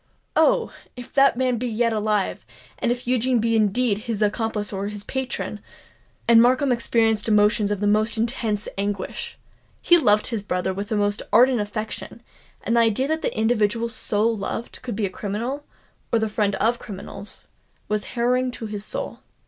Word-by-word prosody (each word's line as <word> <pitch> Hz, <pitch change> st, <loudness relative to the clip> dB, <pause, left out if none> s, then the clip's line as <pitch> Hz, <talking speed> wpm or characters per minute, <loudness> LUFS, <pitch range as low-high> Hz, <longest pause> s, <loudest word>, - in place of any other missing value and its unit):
Oh! -, -, +3 dB, 0.2 s
if 245 Hz, -1 st, -10 dB
that 275 Hz, -3 st, +5 dB
man 255 Hz, -2 st, +1 dB
be 250 Hz, -, -2 dB
yet 230 Hz, 0 st, +1 dB
alive—and 215 Hz, +2 st, -2 dB
if 245 Hz, 0 st, -3 dB
Eugene 250 Hz, 0 st, +2 dB
be 230 Hz, 0 st, +1 dB
indeed 215 Hz, 0 st, +2 dB
his 215 Hz, -2 st, 0 dB
accomplice 210 Hz, 0 st, -1 dB
or 195 Hz, +1 st, -2 dB
his 205 Hz, -1 st, -7 dB
patron——" 265 Hz, +2 st, -4 dB, 0.7 s
And 230 Hz, -1 st, +7 dB
Markham 255 Hz, +3 st, +3 dB
experienced 225 Hz, -2 st, +1 dB
emotions 210 Hz, -1 st, +3 dB
of 205 Hz, -1 st, -2 dB
the -, -, +1 dB
most 215 Hz, +2 st, +2 dB
intense 220 Hz, -2 st, -1 dB
anguish! 200 Hz, -1 st, -3 dB, 0.4 s
He 345 Hz, -1 st, +5 dB
loved 210 Hz, -7 st, +3 dB
his 225 Hz, -4 st, -2 dB
brother 190 Hz, -1 st, -1 dB
with 200 Hz, +2 st, -4 dB
the 215 Hz, -, -1 dB
most 205 Hz, 0 st, 0 dB
ardent 250 Hz, +1 st, +5 dB
affection; 215 Hz, +1 st, -5 dB, 0.4 s
and 230 Hz, -, 0 dB
the -, -, +5 dB
idea 230 Hz, +4 st, +2 dB
that 315 Hz, 0 st, 0 dB
the -, -, -2 dB
individual 220 Hz, 0 st, +1 dB
so 215 Hz, -2 st, -1 dB
loved 225 Hz, +1 st, -3 dB
could 245 Hz, -4 st, -5 dB
be 210 Hz, 0 st, 0 dB
a -, -, -2 dB
criminal, 235 Hz, +10 st, -4 dB, 0.5 s
or 230 Hz, -, +4 dB
the 220 Hz, -1 st, 0 dB
friend 205 Hz, -1 st, 0 dB
of 235 Hz, +2 st, +1 dB
criminals, 200 Hz, -1 st, -9 dB, 0.4 s
was 210 Hz, 0 st, -1 dB
harrowing 250 Hz, +2 st, +1 dB
to 230 Hz, -, -6 dB
his 210 Hz, -1 st, -5 dB
soul. -, -, -4 dB
220 Hz, 175 wpm, -23 LUFS, 205-240 Hz, 0.7 s, And